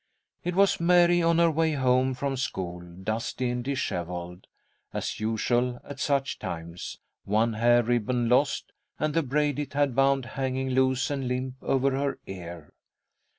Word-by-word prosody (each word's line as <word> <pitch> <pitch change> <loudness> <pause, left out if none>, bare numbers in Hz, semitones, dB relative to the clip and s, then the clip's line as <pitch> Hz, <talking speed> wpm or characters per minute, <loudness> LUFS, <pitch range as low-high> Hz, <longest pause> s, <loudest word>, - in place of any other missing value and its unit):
It 180 0 -2
was 200 +1 +4
Mary 175 0 +5
on 165 0 +3
her 170 -1 +5
way 160 0 +1
home 130 -1 +2
from 140 +1 -2
school, 90 -9 -3
dusty 110 +8 -3
and 125 0 -3
dishevelled, 90 -9 -4 0.4
as - - -3
usual 120 +3 0
at 140 -2 -9
such 140 -2 0
times, 85 -3 -6 0.3
one 110 +3 +1
hair 120 +2 +4
ribbon 120 +1 0
lost, 130 +4 +2 0.3
and 155 -1 -1
the 165 - +3
braid 145 +1 0
it 145 -1 -4
had 140 -3 +1
bound 135 -1 +3
hanging 130 0 -2
loose 130 +1 +2
and 135 -3 -2
limp 125 +1 -2
over 135 0 +1
her 135 +1 -1
ear. 85 -4 -9
130 Hz, 150 wpm, -27 LUFS, 110-140 Hz, 0.4 s, Mary